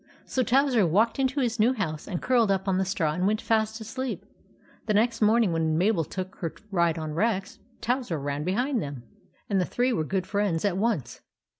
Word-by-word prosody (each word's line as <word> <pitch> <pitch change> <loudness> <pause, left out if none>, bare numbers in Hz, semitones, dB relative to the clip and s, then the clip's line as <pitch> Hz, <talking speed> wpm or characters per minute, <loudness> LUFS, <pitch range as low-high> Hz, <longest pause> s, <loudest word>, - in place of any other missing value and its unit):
So 260 - -1
Towser 255 -2 +3
walked 220 - +2
into 270 +1 +1
his 235 -2 -1
new 235 +4 +4
house 160 -10 -4
and 180 -4 -3
curled 240 -4 +3
up 195 0 0
on 190 -1 +2
the 190 - +1
straw 180 -6 0
and 180 +4 0
went 215 +1 +1
fast 220 0 0
asleep. 250 +4 -5 0.6
The 215 - +2
next 230 +2 +2
morning 215 -3 +4
when 160 -1 +1
Mabel 185 -1 +2
took 185 +4 -6
her 165 -3 -4 0.2
ride 170 -3 +2
on 155 -1 -4
Rex, 200 +2 -1 0.2
Towser 245 - -1
ran 145 +1 -3
behind 240 - 0
them, 140 -4 -6 0.4
and 195 -2 +1
the - - +2
three 245 +7 0
were 160 - 0
good 185 +3 -2
friends 200 -4 0
at 195 -3 +1
once. 195 - -1
200 Hz, 200 wpm, -27 LUFS, 170-230 Hz, 0.6 s, new